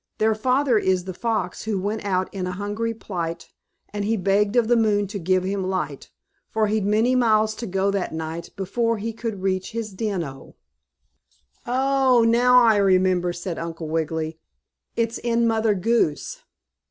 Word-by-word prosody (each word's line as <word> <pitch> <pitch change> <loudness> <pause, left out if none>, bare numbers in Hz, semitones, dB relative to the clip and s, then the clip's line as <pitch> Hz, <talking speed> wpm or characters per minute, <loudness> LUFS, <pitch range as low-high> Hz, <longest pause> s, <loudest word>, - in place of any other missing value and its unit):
Their 220 +1 +3
father 250 +2 +2
is 185 -2 +1
the 185 0 -6
fox 215 -3 -2
who 215 -3 -1
went 210 +3 -3
out 190 -2 -1
'in 185 -2 -3
a 180 - -3
hungry 205 +4 -3
plight, 175 -7 -5 0.4
and 205 -1 -2
he 220 +2 0
begged 200 +2 +1
of 240 -2 +3
the 240 - +4
moon 210 -3 +2
to 200 +1 -6
give 185 +1 +1
him 195 +1 -2
light, 155 -7 -3 0.4
for 220 -1 +1
he'd 210 -1 0
many 220 +4 +3
miles 220 -3 +3
to 235 - -5
go 195 +1 0
that 200 -2 -2
night, 160 +1 -5
before 230 +4 -1
he 225 +2 -4
could 220 -4 -5
reach 185 0 -1
his 225 -3 -4
den 195 -3 -2
O.'" 135 -3 -10 1.1
"Oh, 260 -1 +3
now 250 +2 +5
I 220 -2 +5
remember," 185 -2 +3
said 175 0 -5
Uncle 165 -1 -5
Wiggily. 160 0 -2 0.6
"It's 230 0 -1
in 235 0 +1
Mother 220 -2 +2
Goose." 190 -6 0
205 Hz, 170 wpm, -23 LUFS, 185-230 Hz, 1.1 s, now